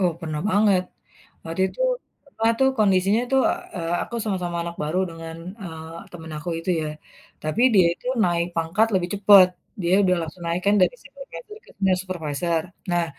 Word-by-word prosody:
Oh, 180 -3 +2
pernah 155 -3 -4
banget. 205 -2 +4 0.6
Waktu 165 +2 -4
itu - - -12 0.6
pernah 225 +1 +3
tuh 265 - +5
kondisinya 195 +1 +3
itu, 270 - +1 0.4
eee, 165 -1 -2
aku - - -7
sama-sama 180 -5 -2
anak 170 0 -6
baru 155 +4 -1
dengan, 165 0 -8 0.3
eee, 160 -2 -8 0.2
teman 160 -2 -9
aku 165 +3 -5
itu 165 +3 -3
ya. - - -3 0.6
Tapi 155 +10 0
dia 185 -4 +6
itu - - -17 0.2
naik 170 -1 +1
pangkat 165 +7 +2
lebih 180 -2 +1
cepet. 200 -2 +7 0.3
Dia 175 +2 +2
udah 185 -2 +3
langsung 165 +2 -8
naik 170 +2 -1
kan, 200 - +5
dari - - +3
supervisor - - -11 0.2
ke - - -19
senior 190 -2 +2
supervisor. 165 -2 -2 0.3
Nah, 175 -1 +2
175 Hz, 175 wpm, -23 LUFS, 165-195 Hz, 0.6 s, cepet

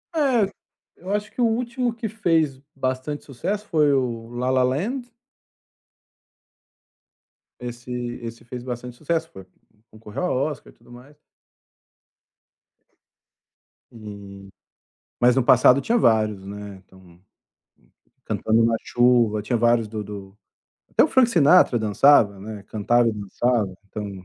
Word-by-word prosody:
É, 260 -9 +2 0.5
eu 185 - -9
acho 210 0 -2
que - - -6
o - - +4
último 240 +2 -1
que 230 -1 -5
fez 165 -10 0 0.2
bastante 130 +2 -3
sucesso 195 - -4
foi 150 -3 +3
o 120 -4 -2
La 120 +1 -3
La 130 -1 +3
Land 230 - -2 2.5
Esse 120 0 -8 0.3
esse 115 0 -8
fez 120 +1 -8
bastante 125 -1 -6
sucesso, 160 +4 -2
foi 95 -1 -12 0.5
concorreu 110 +5 -7
ao 180 - 0
Oscar 150 +2 -4
e - - -33
tudo - - -21
mais. 125 +4 -15 2.8
E, 100 -3 -11 0.7
mas 120 0 +4
no 130 - +2
passado 125 +2 +5
tinha 235 +9 +1
vários, 110 - +2
né, 100 0 -8
então 90 -2 -20 1.0
Cantando 110 +1 +1
na 115 0 +2
chuva, 120 -3 +2
tinha 120 +3 -1
vários 115 -1 +2
do 105 0 -5
do 100 -1 -10 0.5
até - - +4
o - - 0
Frank 260 -3 +4
Sinatra 165 - +5
dançava, 110 -1 +4
né, 105 0 -8
cantava 120 +3 +2
e 115 - 0
dançava 105 0 -1
então 100 -2 -7
120 Hz, 130 wpm, -23 LUFS, 105-155 Hz, 2.8 s, passado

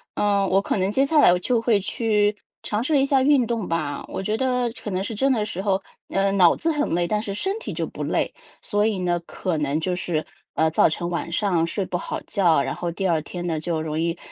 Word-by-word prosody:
嗯， 200 -1 +2
我 195 +1 +3
可 - - -1
能 190 +1 0
接 270 +5 +3
下 305 +1 +3
来 - - +7
我 180 - +2
就 235 +4 +1
会 225 -3 +3
去 210 0 +1 0.3
尝 215 +3 -1
试 290 0 +2
一 270 - +3
下 275 -1 +3
运 270 -4 +4
动 230 -5 -2
吧， 155 -4 -2
我 - - -4
觉 210 +3 -1
得 250 -2 +1
可 210 - -4
能 185 0 -1
是 210 +3 -4
真 270 +5 +2
的 215 -4 +1
时 190 -2 -4
候 195 -1 +1 0.3
呃， 195 0 +1
脑 180 -4 +6
子 330 - -1
很 295 -1 0
累， 175 0 +1
但 210 +3 0
是 200 -3 -4
身 390 - -2
体 - - -6
就 - - -2
不 - - -6
累。 - - -1 0.3
所 205 0 0
以 215 -4 0
呢， 175 -1 +1
可 180 -2 -3
能 145 +1 0
就 180 +2 -1
是， 165 -3 -2 0.3
呃， 160 - +3
造 160 - +4
成 170 +2 -3
晚 170 -1 -3
上 175 -3 +1
睡 195 +3 -2
不 180 - -2
好 - - -4
觉， 170 -7 +3
然 - - -3
后 175 -1 -3
第 190 +3 -2
2 165 -3 +2
天 175 +2 -6
呢 160 -2 -1
就 160 -1 -2
容 155 -1 -3
易 170 +1 -1
195 Hz, 270 characters per minute, -23 LUFS, 170-225 Hz, 0.3 s, 来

